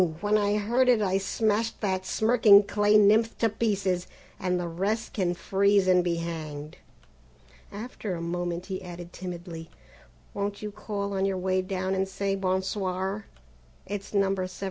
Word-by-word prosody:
When 210 +2 +1
I 205 0 +2
heard 240 +5 +2
it 240 -3 +5
I 195 -2 +1
smashed 220 +3 0
that 190 -2 -1
smirking 220 -2 +6
clay 210 +1 +3
nymph 215 +2 +4
to 225 - +2
pieces, 195 -5 -1 0.3
and 180 -1 0
the 175 - -3
rest 200 +7 -2
can 180 -4 0
freeze 200 +1 +2
and 180 -1 +5
be 175 -1 0
hanged!" 155 -2 -6 0.9
After 210 -2 -5
a - - -5
moment 175 +1 -3
he 190 -1 -5
added 175 -1 -9
timidly: 175 -2 -7 0.6
"Won't 200 +1 -3
you 210 - -4
call 200 -1 -4
on 195 0 0
your 195 -1 0
way 185 0 +1
down 185 0 -2
and 190 0 0
say 195 0 -1
bon 190 -1 0
soir? 190 +1 -3 0.6
It's 200 0 -6
No. 195 -1 +2
17." 185 -1 -2
195 Hz, 165 wpm, -27 LUFS, 180-205 Hz, 0.9 s, smirking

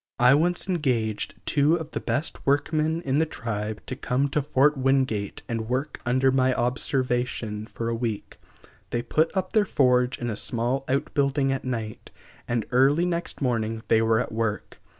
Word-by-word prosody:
I 125 +2 +6
once 175 +5 +2
engaged 125 - -1
two 150 +2 +3
of 160 -2 -5
the - - -3
best 150 +4 -3
workmen 155 +3 +1
in 135 0 +1
the 160 - +3
tribe 110 -6 -4
to 130 - -4
come 135 +2 0
to 150 - 0
Fort 145 +1 +3
Wingate 130 -6 0
and 115 -1 -3
work 135 +3 -2
under 130 +2 +3
my 130 -1 +2
observation 125 -3 -1
for 115 - -5
a 115 - 0
week. 115 -3 -4 0.5
They 120 0 -2
put 160 +5 +2
up 185 -1 -2
their 215 - +5
forge 125 -8 +2
in 120 -1 -3
a - - -3
small 125 +4 -2
outbuilding 140 +1 +1
at 135 -1 -3
night, 115 -4 -4 0.4
and 120 -2 -1
early 140 +7 +4
next 170 -4 -3
morning 115 -3 -1
they 110 - +5
were 110 0 +3
at 125 - -3
work. 110 -1 -3
130 Hz, 170 wpm, -25 LUFS, 115-145 Hz, 0.5 s, I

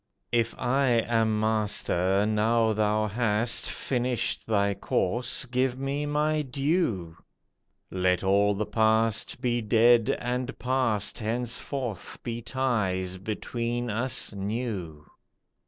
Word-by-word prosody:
"If 115 -1 +1
I 135 +2 +1 0.2
am 110 -2 +1
Master, 105 -3 +1
now 110 +1 +2
thou 110 0 +1
hast 115 +1 +1
Finished 125 -2 -1
thy 100 -2 +2
course, 120 +7 0
give 130 0 0
me 140 +2 -2
my 150 +1 +1
due. 135 - -1 0.8
Let 90 -1 +1
all 100 +1 +3
the 105 +2 -2
past, 110 +2 +1
be 120 -2 0
dead 115 +1 +4
and 125 +1 -3
past, 125 -5 0
Henceforth 120 -1 -3
be 120 0 -4
ties 105 -8 -1
between 115 +4 -3
us 115 +1 -1
new." 100 -7 -4
115 Hz, 105 wpm, -27 LUFS, 105-125 Hz, 0.8 s, dead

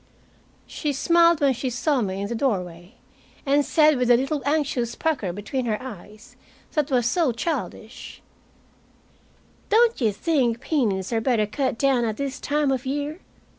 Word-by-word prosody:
She 295 -2 -3
smiled 335 +3 +3
when 275 -2 +4
she 255 +2 -3
saw 255 +3 0
me 195 -2 -3
in - - -3
the 235 - -4
doorway, 185 -6 -3 0.5
and 285 +1 +3
said, 305 -1 +4
with 250 - +1
the 240 -1 +6
little 275 +3 -2
anxious 285 -6 0
pucker 290 - -1
between 210 +7 -4
her 215 -2 -1
eyes 215 -3 -11 0.4
that 300 -1 0
was 250 -4 +1
so 290 +3 +2
childish, 240 -3 -5 1.5
"Don't 460 - +3
you 220 -3 +3
think 245 - 0
peonies 230 - -1
are 225 - +1
better 225 -3 +1
cut 260 +3 -2
down 270 -2 +2
at 220 -2 -2
this 280 0 -4
time 290 -1 0
of 260 -2 -1
year?" 290 +4 -3
260 Hz, 160 wpm, -24 LUFS, 225-290 Hz, 1.5 s, the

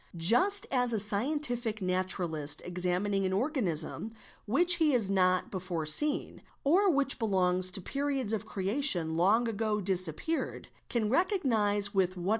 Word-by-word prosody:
Just 245 - +4
as 245 -2 +1
a 220 - -1
scientific 235 +1 -1
naturalist, 180 -5 -1
examining 180 +3 -1
an 190 0 -1
organism 210 - -2 0.4
which 345 - +4
he 310 -4 +2
has 220 -6 0
not 185 -1 +1
before 180 -4 -4
seen, 295 - +2 0.2
or 375 +8 +3
which 280 -4 +1
belongs 185 -4 +1
to 190 +1 -3
periods 275 -1 -2
of 220 - -2
creation 195 - +1
long 205 +8 +2
ago 215 -1 -2
disappeared, 185 - -1 0.2
can 230 -3 -1
recognise 220 - 0
with 185 -1 0
what. 180 +2 -4
205 Hz, 135 wpm, -29 LUFS, 185-265 Hz, 0.4 s, Just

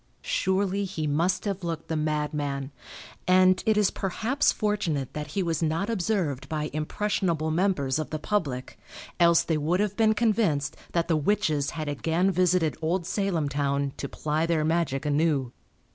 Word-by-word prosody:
Surely 200 - 0
he 180 -5 -3
must 170 +6 +1
have 195 -2 -3
looked 165 -1 -4
the 160 - -2
madman, 150 -2 -2 0.6
and 185 0 +5
it 220 -1 +4
is 210 -2 +3
perhaps 225 +8 0
fortunate 190 - -1
that 150 -1 -4
he 195 - +2
was 165 -2 -1
not 165 +7 0
observed 180 - -1
by 150 -1 -2
impressionable 160 0 -1
members 155 -6 +1
of 155 - -3
the 155 - -3
public 150 -8 -2 0.4
else 170 -1 +5
they 160 -2 0
would 165 +5 +1
have 205 -1 0
been 220 -1 +3
convinced 210 -11 +1 0.2
that 170 -1 +1
the 165 - +2
witches 155 -3 +1
had 155 -1 -3
again 165 +6 +1
visited 180 -3 +2
old 170 +2 0
Salem 185 -5 0
town 140 -1 -1
to 140 - -4
ply 155 +2 -1
their 160 -2 +1
magic 160 -4 0
anew. 145 -4 +1
165 Hz, 160 wpm, -27 LUFS, 150-190 Hz, 0.6 s, and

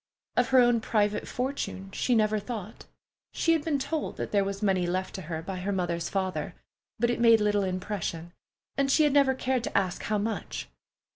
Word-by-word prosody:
Of - - +2
her 260 - +4
own 240 -2 +5
private 210 -2 0
fortune 250 -7 -3
she 245 +4 +1
never 215 -1 +2
thought. 215 -1 -7 0.5
She 330 - +2
had 320 -2 +1
been 300 -3 +1
told 300 +3 -3
that - - -4
there 200 -1 +3
was 200 +1 -4
money 190 -3 +2
left 185 +2 -2
to 190 - -5
her 160 -1 -5
by 190 +2 -5
her 185 +3 -2
mother's 175 -3 -1
father, 185 -6 -2 0.4
but 235 +2 +2
it - - -2
made 230 -1 +6
little 205 -1 +2
impression, 185 -3 -3 0.4
and 275 0 +1
she 310 - +5
had 295 -2 +3
never 275 -2 +4
cared 255 -1 0
to - - -1
ask 185 -3 0
how 215 - 0
much. 220 +2 -3
210 Hz, 200 wpm, -28 LUFS, 185-245 Hz, 0.5 s, made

